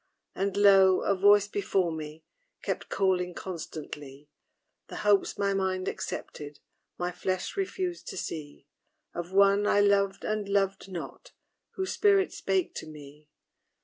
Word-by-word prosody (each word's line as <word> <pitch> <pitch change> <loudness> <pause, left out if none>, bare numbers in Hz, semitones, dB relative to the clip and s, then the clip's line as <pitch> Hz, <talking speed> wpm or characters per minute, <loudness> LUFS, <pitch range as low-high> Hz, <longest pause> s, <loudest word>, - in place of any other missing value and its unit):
And, 195 0 -2
lo! 195 -2 +6
a - - +2
voice 205 +1 +5
before 195 -3 0
me 155 0 -7 0.4
Kept - - -3
calling 180 -2 0
constantly 150 -5 -8 0.6
The - - -9
hopes 205 -1 +3
my 200 0 +1
mind 190 -1 -1
accepted, 150 -5 -6 0.4
My 175 0 -2
flesh 185 +1 -3
refused 375 -3 -3
to - - -6
see 145 -5 -6 0.5
Of 175 +1 -5
one 200 +1 +4
I 205 - +4
loved 200 -1 +2
and 215 -2 -2
loved 195 -1 0
not, 175 - -8 0.4
Whose 380 -1 -2
spirit 400 -2 +3
spake 375 -2 -1
to - - -7
me. 150 0 -13
190 Hz, 135 wpm, -28 LUFS, 170-200 Hz, 0.6 s, lo